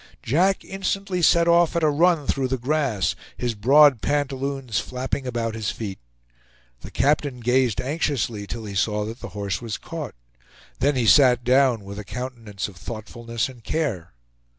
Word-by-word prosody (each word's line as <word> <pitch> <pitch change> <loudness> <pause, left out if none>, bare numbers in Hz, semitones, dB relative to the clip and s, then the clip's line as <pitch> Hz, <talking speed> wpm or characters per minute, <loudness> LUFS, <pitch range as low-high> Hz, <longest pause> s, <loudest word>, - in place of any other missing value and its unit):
Jack 185 +9 +2
instantly 195 -1 -2
set 170 0 +4
off 170 0 +4
at 170 - +1
a 155 - +5
run 165 0 +3
through 135 -1 0
the 130 +1 -1
grass, 125 - 0 0.2
his 120 -1 -1
broad 135 +4 +5
pantaloons 135 -4 -1
flapping 130 +1 -4
about 115 -2 -2
his 110 -2 -3
feet. 100 -4 -5 0.8
The - - -10
captain 140 0 +1
gazed 125 -1 +2
anxiously 130 -7 -2
till 115 +1 -6
he 100 - -6
saw 105 +2 0
that 115 +3 -7
the - - -7
horse 100 0 -2
was 115 -3 -4
caught; 155 -7 -7 0.6
then 140 +3 +2
he 125 -2 +1
sat 125 -1 +6
down, 125 -3 +3
with 100 +1 -8
a - - -5
countenance 115 -4 -5
of 100 -4 -13
thoughtfulness 115 +3 -4
and 125 -3 -13
care. 110 - -2
125 Hz, 165 wpm, -23 LUFS, 110-145 Hz, 0.8 s, sat